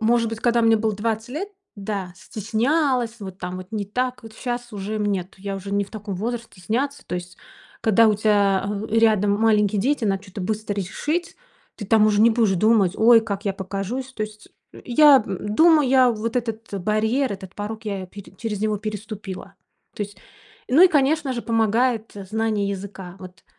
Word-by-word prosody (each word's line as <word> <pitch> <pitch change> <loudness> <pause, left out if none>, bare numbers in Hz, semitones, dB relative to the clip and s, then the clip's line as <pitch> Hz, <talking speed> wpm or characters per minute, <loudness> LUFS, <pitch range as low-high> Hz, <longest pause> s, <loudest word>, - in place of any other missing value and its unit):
может 230 +1 +2
быть, 225 0 -6
когда 235 -1 +2
мне 225 0 +5
было 215 -1 0
20 220 +2 -2
лет 335 +10 -4 0.3
да, 195 -3 -4
стеснялась, 235 - 0
вот 190 -2 -8
там 180 -1 -5
вот 185 - -9
не 210 -2 -2
так. 250 +4 -2
Вот 220 -1 -12
щас 240 -1 -5
уже 205 +2 -4
мне, 205 -3 0
нет, 180 +2 -12
я 195 0 -4
уже 195 +1 -7
не 200 0 +1
в - - -18
таком 210 -2 -6
возрасте 235 +4 -3
стесняться, 270 +9 -2
то - - -4
есть. 180 0 -6 0.5
Когда 220 +1 +5
у 215 - +3
тя, 205 -2 +2
а, 205 +2 -3
рядом 215 -2 +3
маленькие 210 -2 +3
дети, 265 +2 +1
надо 195 -2 0
чё-то 195 0 -9
быстро 210 +2 -2
решить, 300 - -3 0.4
ты 210 - -6
там 215 0 +5
уже 210 -1 +3
не 230 - +6
будешь 225 -3 +2
думать: 205 -1 +3
"Ой, 225 +1 +7
как 205 -1 -5
я 200 - 0
покажусь!" 195 +7 -5
То 215 - -4
есть 215 0 -8 0.2
я 275 0 +5
думаю, 265 - +3
я 255 -1 +5
вот 225 +1 -3
этот 225 -3 -4
барьер, 220 +6 +1
этот 190 -1 -9
порог 220 +2 -6
я 195 -3 -4
пере 200 +1 -12
через 210 -3 -3
него 215 -1 0
переступила, 210 -2 -7 0.4
то - - -3
есть. 205 0 -8 0.5
Ну 290 +8 +6
и 375 - +9
конечно 290 -2 +2
же 235 - -4
помогает 225 0 +1 0.2
знание 215 -1 0
языка, 195 -2 -7
вот. 185 -1 -12
215 Hz, 190 wpm, -23 LUFS, 200-235 Hz, 0.5 s, и